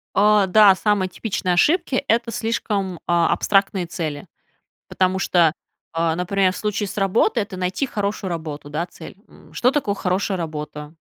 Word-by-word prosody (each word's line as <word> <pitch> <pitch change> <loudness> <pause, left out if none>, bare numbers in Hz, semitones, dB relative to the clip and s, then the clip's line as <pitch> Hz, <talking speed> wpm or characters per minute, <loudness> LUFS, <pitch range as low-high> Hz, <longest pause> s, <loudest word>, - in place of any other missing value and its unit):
О 210 0 +4
да, 205 +1 +7
самые 205 -1 +1
типичные 185 -2 -2
ошибки- 310 - +2
это 230 +1 +1
слишком, 210 -5 -2
э, - - -17
абстрактные 185 +2 +2
цели. 155 -3 -5 0.6
Потому 185 0 0
что, 170 -4 +3 0.4
э, 165 -1 +1
например, 185 +2 +1
в - - -9
случае 210 -1 -2
с 215 - -8
работой- 210 +3 +2
это 200 -2 -8
найти 185 +8 -1
хорошую 205 -4 -3
работу, 155 -3 -6
да, 160 +4 -2
цель. 170 0 -12
М, - - -19
что 250 - +2
такое 275 -9 0
хорошая 190 0 -1
работа? 150 -2 -6
190 Hz, 155 wpm, -21 LUFS, 170-210 Hz, 0.6 s, да